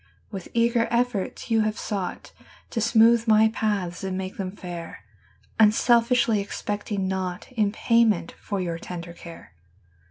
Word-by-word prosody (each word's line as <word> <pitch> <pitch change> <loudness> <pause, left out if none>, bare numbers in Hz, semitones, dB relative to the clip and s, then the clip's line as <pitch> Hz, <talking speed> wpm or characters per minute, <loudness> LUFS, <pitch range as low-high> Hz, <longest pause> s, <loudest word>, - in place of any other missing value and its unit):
% 90 -2 -35
W 195 - -4
ITH - - -13
eager 235 0 +2
efforts 240 -1 -1
you 225 -1 +4
Have 215 0 0
sougkt 195 -6 -4 0.4
To 230 - -2
smootk 230 +1 +4
my 220 0 +5
paths 200 -5 -2
and 190 -1 -3
make 190 0 -5
them 190 -3 -3
fair, 175 - -8 0.6
Unselfiskly 230 0 +4
expect 205 +1 -5
5 205 - -2
mg 190 -1 -1
naugkt 185 +2 -4
In 215 -5 +1
payment 230 -5 +2
for 200 -2 -4
your 170 -2 -3
tender 170 -1 -7
care. 170 - -12
205 Hz, 160 wpm, -25 LUFS, 185-230 Hz, 0.6 s, my